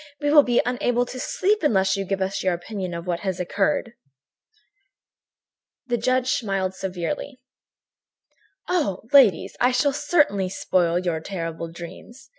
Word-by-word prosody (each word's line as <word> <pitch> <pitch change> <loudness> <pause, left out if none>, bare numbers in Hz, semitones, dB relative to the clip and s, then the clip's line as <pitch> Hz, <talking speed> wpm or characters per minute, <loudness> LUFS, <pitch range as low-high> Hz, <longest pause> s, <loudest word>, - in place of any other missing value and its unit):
We 290 0 0
will 300 -1 +8
be 245 -3 +2
unable 245 0 0
to 255 +1 -8
sleep 410 +10 0
unless 195 -8 +2
you 195 0 -3
give 195 0 -1
us 190 +1 -3
your 185 -2 +1
opinion 185 0 -5
of 170 +1 -6
what 175 -2 -2
had 190 -3 -3
occurred." 205 +7 0 1.9
The 240 -2 0
judge 255 +2 +1
smiled 195 -4 -1
severely: 190 - -4 1.3
"Oh! 305 - -1
Ladies, 260 -9 +5
I 250 - +4
shall 275 +3 +2
certainly 265 - +1
spoil 175 -2 +1
your 175 -3 -1
terrible 165 -1 -5
dreams. 180 +10 -11
195 Hz, 140 wpm, -23 LUFS, 180-255 Hz, 1.9 s, will